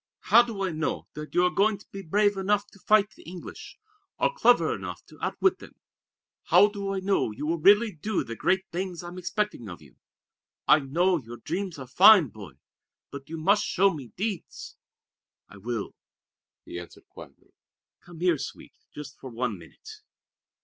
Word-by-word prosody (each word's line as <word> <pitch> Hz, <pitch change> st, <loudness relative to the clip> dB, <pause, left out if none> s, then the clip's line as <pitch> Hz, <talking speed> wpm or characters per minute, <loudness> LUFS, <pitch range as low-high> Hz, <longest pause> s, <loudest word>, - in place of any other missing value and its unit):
"How 235 Hz, -, +10 dB
do 225 Hz, -5 st, -4 dB
I 190 Hz, -, -1 dB
know 155 Hz, 0 st, -3 dB
that 150 Hz, 0 st, -9 dB
you 180 Hz, -, +4 dB
are 180 Hz, -, +2 dB
going 205 Hz, +1 st, +2 dB
to 200 Hz, -, -18 dB
be 195 Hz, -, -7 dB
brave 205 Hz, +4 st, +2 dB
enough 200 Hz, +1 st, 0 dB
to 200 Hz, -, -18 dB
fight 210 Hz, +1 st, +3 dB
the -, -, -18 dB
English, 175 Hz, +1 st, -10 dB, 0.4 s
or -, -, +1 dB
clever -, -, +4 dB
enough -, -, -7 dB
to -, -, -17 dB
outwit 385 Hz, -, +1 dB
them? -, -, -14 dB, 0.7 s
How 205 Hz, -, +6 dB
do 200 Hz, -1 st, -4 dB
I 190 Hz, -, -3 dB
know 195 Hz, -, +1 dB
you 110 Hz, +8 st, -6 dB
will 165 Hz, +2 st, -1 dB
really 205 Hz, +6 st, +5 dB
do 200 Hz, +5 st, -2 dB
the 115 Hz, -, -7 dB
great 190 Hz, +9 st, +1 dB
things 180 Hz, 0 st, -4 dB
I'm 175 Hz, +1 st, -8 dB
expecting 185 Hz, -, -3 dB
of 85 Hz, -, -9 dB
you? 70 Hz, -5 st, -19 dB, 0.7 s
I 150 Hz, -, +7 dB
know 170 Hz, +6 st, +1 dB
your 120 Hz, -2 st, -10 dB
dreams 175 Hz, -, -4 dB
are 135 Hz, -, -7 dB
fine, 180 Hz, -, +7 dB
Boy; 100 Hz, -8 st, -11 dB, 0.6 s
but 140 Hz, -1 st, -9 dB
you 165 Hz, -, -5 dB
must 200 Hz, +6 st, +3 dB
show 195 Hz, +1 st, +2 dB
me 140 Hz, -6 st, -8 dB
deeds." 200 Hz, -2 st, -5 dB, 0.7 s
"I 100 Hz, -, -15 dB
will," 115 Hz, +1 st, -4 dB, 0.7 s
he 85 Hz, -, -7 dB
answered 85 Hz, -, -13 dB
quietly. -, -, -15 dB, 0.5 s
"Come 175 Hz, -2 st, -14 dB
here, 175 Hz, -5 st, +2 dB
Sweet, -, -, -8 dB, 0.2 s
just 145 Hz, -2 st, -10 dB
for 130 Hz, -, -9 dB
one 115 Hz, -4 st, -3 dB
minute!" 430 Hz, -, -14 dB
180 Hz, 180 wpm, -26 LUFS, 140-200 Hz, 0.7 s, How